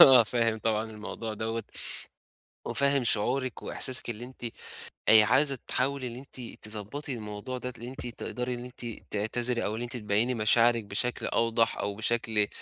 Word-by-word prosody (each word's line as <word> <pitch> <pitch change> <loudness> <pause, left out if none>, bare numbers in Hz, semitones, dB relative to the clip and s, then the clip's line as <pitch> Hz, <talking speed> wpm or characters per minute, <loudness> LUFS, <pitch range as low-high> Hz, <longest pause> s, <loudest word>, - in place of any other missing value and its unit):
آه، 130 -3 +10
فاهم 115 +1 +1
طبعًا 110 0 0
الموضوع 110 +1 -6
دوّة 115 +2 -3 1.0
وفاهم 140 -1 +2
شعورِك 125 +3 0
وإحساسِك 130 -2 -2
اللي 120 +1 -5
أنتِ 125 -1 -11 0.7
آآ 110 -1 +10
عايزة 135 +4 +4
تحاولي 135 0 0
إن 120 - -7
أنتِ 125 -4 -9
تضبّطي 110 +7 -5
الموضوع 105 +2 -5
ده 125 0 -5
اللي 120 - -6
أنتِ 130 -1 -6
تقدري 125 +1 -3
إن 120 0 -6
أنتِ 125 -1 -9 0.3
تعتذري 115 +3 +1
أو 105 - 0
اللي 115 - -3
أنتِ 120 +1 -5
تبيّني 110 +3 +3
مشاعرِك 115 +1 +4
بشكل 115 +5 -2
أوضح 115 0 +2
أو 100 0 -2
بشكل 110 -1 +2
120 Hz, 155 wpm, -29 LUFS, 110-125 Hz, 1.0 s, آه